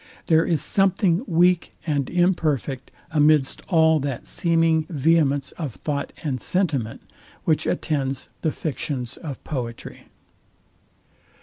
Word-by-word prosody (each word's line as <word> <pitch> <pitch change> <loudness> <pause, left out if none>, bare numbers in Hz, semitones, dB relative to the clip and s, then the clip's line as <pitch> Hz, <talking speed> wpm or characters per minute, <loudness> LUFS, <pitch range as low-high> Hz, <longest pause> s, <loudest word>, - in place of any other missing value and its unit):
There 160 0 +4
is 165 -3 +1
something 190 -1 +2
weak 175 0 +2
and 145 -5 -1
imperfect 155 -7 0 0.2
amidst 150 -3 +3
all 160 -3 +4
that 135 -3 -4
seeming 165 -2 +1
vehemence 145 -3 +2
of 145 -9 -4
thought 145 -2 -3
and 135 -6 -2
sentiment, 145 - -1 0.4
which 155 -2 +1
attends 135 -4 -2
the 160 - +1
fictions 130 -5 -4
of 145 -6 -7
poetry. 120 -6 -6
155 Hz, 110 wpm, -23 LUFS, 135-165 Hz, 0.4 s, There